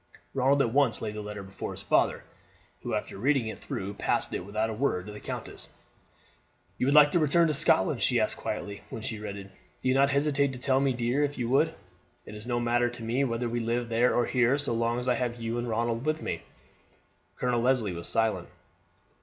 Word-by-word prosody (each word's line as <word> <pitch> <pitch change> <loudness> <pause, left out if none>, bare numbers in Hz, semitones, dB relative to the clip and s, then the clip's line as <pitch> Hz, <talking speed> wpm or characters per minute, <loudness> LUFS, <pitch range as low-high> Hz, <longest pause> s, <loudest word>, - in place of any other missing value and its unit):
Ronald 135 +1 +3
at 115 - -2
once 140 -4 +3
laid 110 -2 -4
the 105 - -5
letter 105 -1 -6
before 95 0 -6
his - - -5
father, - - +2 0.6
who, - - -2
after - - -4
reading 135 +1 +2
it - - -7
through, 100 +1 -5
passed - - 0
it, - - -3
without 110 +3 -2
a - - -3
word, 105 -6 -1
to 105 - -8
the 105 - -9
countess. - - -7 1.1
"You 125 - +1
would 140 - +3
like 150 -1 +8
to 175 - +3
return 165 +2 +4
to - - +1
Scotland?" 140 -10 +3
she - - +3
asked - - 0
quietly, 100 0 -5
when 110 - -7
she 110 -2 -4
read 105 -1 -6
it. 100 -1 -10 0.3
"Do 130 - +3
not 135 +1 +4
hesitate 140 -1 +1
to - - -7
tell 130 +1 +2
me, 135 0 +2
dear, 120 +4 0
if 145 0 -2
you 120 -2 -1
would. 160 +5 +2 0.5
It - - -10
is 105 +2 -9
no 120 -1 0
matter 120 0 +2
to 120 -1 -9
me 120 +5 0
whether 120 -1 -1
we 120 +1 -2
live 115 +1 -1
there 115 +2 +3
or 120 - +3
here, 125 +1 +2
so 145 -4 -1
long 115 +1 0
as 125 - -5
I 125 - +4
have 120 0 -2
you 115 +1 -2
and 120 0 -3
Ronald 115 +1 -1
with 155 +1 0
me." - - -4 0.9
Colonel 125 -2 0
Leslie 120 -6 +1
was 85 0 -3
silent. 110 -1 +1
120 Hz, 225 wpm, -28 LUFS, 110-135 Hz, 1.1 s, like